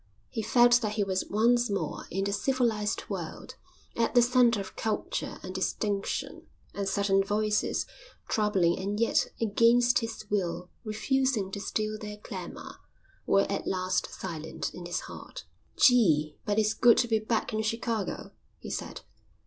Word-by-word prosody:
He 225 - -3
felt 240 +2 +5
that 215 -2 -1
he 210 -1 +1
was 190 -1 -2
once 240 +3 +3
more 200 -1 -3
in 195 +3 -2
the 200 0 -1
civilised 225 -3 0
world, - - -6 0.4
at 230 +2 0
the 245 - +7
centre 245 -2 +4
of 195 - -7
culture 220 -1 -3
and 185 - -6
distinction; 200 +1 -2 0.3
and 200 -1 -2
certain 195 0 +2
voices, 210 +1 0 0.4
troubling 195 -6 +2
and 200 +2 -2
yet 230 - +2
against 235 +3 +4
his 225 -2 -6
will 180 -3 -2
refusing 225 -1 0
to 200 - -4
still 215 +2 -2
their 210 -1 -7
clamour, 210 - -8 0.5
were 195 - +5
at 200 - -3
last 185 -1 -1
silent 160 -4 -5
in 175 -1 -8
his 175 - -2
heart. - - -10 0.3
"Gee, 160 - +4
but 205 0 0
it's 215 0 +3
good 240 -2 +5
to 240 - +2
be 220 -1 +2
back 220 +1 -1
in 215 - 0
Chicago," 225 -1 -2 0.3
he - - -8
said. - - -5
210 Hz, 155 wpm, -29 LUFS, 195-230 Hz, 0.5 s, the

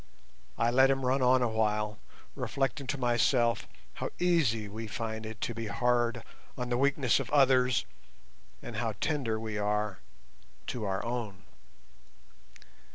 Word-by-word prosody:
I 115 - +2
let 130 +2 +5
him 135 -1 +1
run 130 +2 +2
on 125 0 +4
awhile, 105 -2 0 0.3
reflecting 135 0 -2
to 140 - -1
myself 120 -1 +2 0.3
how - - -4
easy 145 -12 +2
we 110 +2 -6
find 110 0 -4
it 110 -1 -8
to 120 - -2
be 115 0 -5
hard 120 +3 +1 0.3
on 125 0 -3
the 120 - +1
weaknesses 140 -2 +3
of 135 - -4
others, 130 -3 +4 0.8
and - - -6
how - - -1
tender 130 -8 -1
we 110 -2 -4
are 105 -1 -1 0.7
to 115 -4 -4
our 95 +1 -2
own. 110 -7 -4
120 Hz, 140 wpm, -30 LUFS, 110-130 Hz, 0.8 s, let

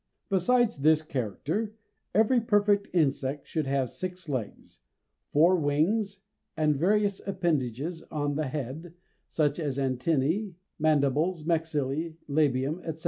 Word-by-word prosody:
Besides 235 +4 +3
this 155 +2 +4
character 155 - -3 0.4
every 225 +4 +4
perfect 205 -2 +2
insect 140 -4 0
should 155 -4 -2
have 135 -1 +1
six 185 -2 -6
legs, 125 - -5 0.5
four 170 +5 +5
wings, 190 +7 0 0.4
and 155 -1 +2
various 200 +5 +1
appendages 165 - -1
on 145 -1 -1
the 150 0 -1
head, 150 +5 -5 0.3
such 150 0 0
as 145 -5 -2
antennæ, 145 - 0 0.2
mandibles, 155 +2 +2
maxillæ, 160 -1 -1
labium, 145 +1 +1
etc. 160 -1 -5
155 Hz, 115 wpm, -28 LUFS, 140-185 Hz, 0.5 s, four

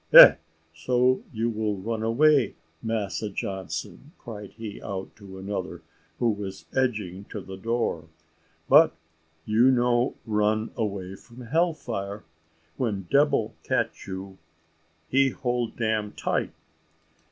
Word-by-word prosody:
Eh! - - +12 0.4
so 125 - +2
you 115 -1 -1
will 105 -2 -1
run 110 +3 -3
away, 130 +2 +3 0.3
Massa 110 -1 -2
Johnson," 95 - -5
cried 105 -5 -8
he 110 -2 -8
out 95 -1 -6
to 100 -3 -11
another, 95 -1 -5 0.3
who 120 -2 +2
was 100 -2 -6
edging 105 -8 -1
to 105 - -7
the 95 0 -8
door; 115 +4 -1 0.6
"but - - +7 0.5
you 115 +4 +4
no 120 0 +2
run 110 0 +1
away 100 -4 -3
from 120 +5 -13
hell 160 +7 +1
fire; 100 -7 -5 0.5
when 105 -6 -1
debil 140 -5 +3
catch - - -1
you 95 0 -7 0.7
he 135 +5 +4
hold 120 -3 -2
dam 110 -2 -1
tight. - - -1
110 Hz, 120 wpm, -26 LUFS, 100-120 Hz, 0.7 s, Eh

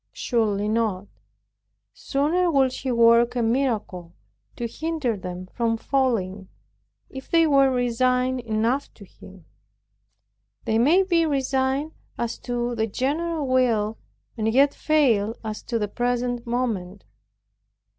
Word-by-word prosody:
Surely 210 -4 0
not. 215 -3 -1 0.9
Sooner 325 +6 0
would 270 -4 +2
He 260 0 -3
work 235 0 +4
a 240 - 0
miracle 225 -8 -1 0.4
to 240 - -4
hinder 305 -1 -2
them 180 -1 -7
from 225 +4 -1
falling, 215 -8 -1 0.6
if 265 0 -9
they 330 -1 +4
were 275 -3 +4
resigned 250 +1 +1
enough 230 +4 -1
to 200 - -13
Him. 185 -2 -16 1.2
They 220 0 +1
may 325 +11 +4
be 340 -3 +2
resigned 270 +1 0 0.3
as 235 -1 -3
to 245 -1 -3
the 220 -1 -1
general 300 +7 -2
will, 230 -5 +1 0.4
and 220 -1 0
yet 275 +4 +4
fail 235 -9 +2
as 215 -1 -5
to 235 - -1
the 210 -2 -1
present 245 +1 -2
moment. 215 -6 -3
245 Hz, 125 wpm, -24 LUFS, 220-270 Hz, 1.2 s, work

